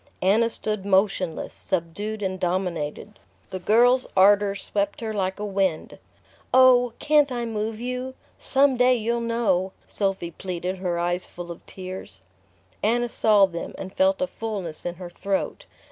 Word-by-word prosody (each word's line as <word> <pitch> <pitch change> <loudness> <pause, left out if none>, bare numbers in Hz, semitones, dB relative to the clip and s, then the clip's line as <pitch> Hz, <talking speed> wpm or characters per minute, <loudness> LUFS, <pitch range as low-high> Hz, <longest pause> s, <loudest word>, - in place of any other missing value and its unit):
Anna 220 +5 +4
stood 215 -3 -3
motionless, 190 -3 +1
subdued 200 +4 -3
and 190 -1 -2
dominated. 180 +1 -3 0.3
The 185 - -4
girl's 245 +6 +4
ardour 200 +1 +5
swept 200 0 -2
her 220 -1 -3
like 190 -2 -2
a 210 - -3
wind. 195 -5 -1 0.5
"Oh, 250 -2 +6
can't 295 -2 +3
I 240 -1 -2
move 220 -1 -3
you? 250 +2 -4 0.2
Some 270 -1 +3
day 250 +1 +5
you'll 235 +1 -1
know!" 205 -6 0
Sophy 195 -4 -2
pleaded, 180 +1 -4
her 180 -2 -1
eyes 175 +1 -1
full 175 0 -8
of 170 - -10
tears. 185 - -8 0.6
Anna 240 +3 +1
saw 210 -3 +5
them, 170 -3 -6
and 190 0 -7
felt 285 0 +2
a - - +3
fullness 200 - -5
in 175 - -4
her 180 0 -8
throat. 195 +2 -3
200 Hz, 150 wpm, -24 LUFS, 185-235 Hz, 0.6 s, Oh